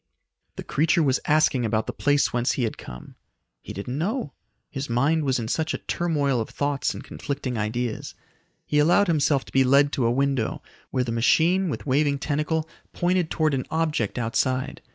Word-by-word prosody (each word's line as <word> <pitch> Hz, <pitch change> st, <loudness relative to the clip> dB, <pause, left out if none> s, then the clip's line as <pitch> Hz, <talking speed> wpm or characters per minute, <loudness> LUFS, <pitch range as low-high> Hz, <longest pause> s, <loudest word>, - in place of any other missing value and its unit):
The -, -, -6 dB
creature 160 Hz, +3 st, +2 dB
was 135 Hz, -2 st, +2 dB
asking 150 Hz, -4 st, +3 dB
about 110 Hz, -1 st, 0 dB
the -, -, -4 dB
place 145 Hz, 0 st, +1 dB
whence 120 Hz, +1 st, +1 dB
he 130 Hz, -, -1 dB
had 110 Hz, -, -1 dB
come. 60 Hz, 0 st, -10 dB, 0.5 s
He -, -, -9 dB
didn't 125 Hz, +8 st, -5 dB
know; 205 Hz, -, -2 dB, 0.4 s
his 135 Hz, -1 st, -5 dB
mind 145 Hz, +6 st, +2 dB
was 130 Hz, -2 st, +1 dB
in 115 Hz, -2 st, -3 dB
such 155 Hz, +6 st, -1 dB
a -, -, -2 dB
turmoil 145 Hz, -7 st, 0 dB
of 110 Hz, -, -5 dB
thoughts 145 Hz, -1 st, -1 dB
and -, -, -8 dB
conflicting 140 Hz, -3 st, -4 dB
ideas. 115 Hz, +2 st, -3 dB, 0.5 s
He 150 Hz, -, +1 dB
allowed 175 Hz, +7 st, +4 dB
himself 150 Hz, -5 st, +1 dB
to -, -, -15 dB
be 135 Hz, -, +5 dB
led 140 Hz, +2 st, +4 dB
to 125 Hz, -6 st, +1 dB
a -, -, +2 dB
window 135 Hz, -2 st, 0 dB, 0.3 s
where 130 Hz, -1 st, 0 dB
the 120 Hz, -, -3 dB
machine 165 Hz, +11 st, +3 dB
with -, -, -5 dB
waving 140 Hz, +1 st, +2 dB
tentacle 155 Hz, +3 st, -1 dB, 0.3 s
pointed 175 Hz, -1 st, +1 dB
towards 155 Hz, -2 st, +1 dB
an 130 Hz, -2 st, -2 dB
object 155 Hz, -9 st, -1 dB
outside. 130 Hz, +2 st, -1 dB
140 Hz, 185 wpm, -24 LUFS, 125-155 Hz, 0.5 s, be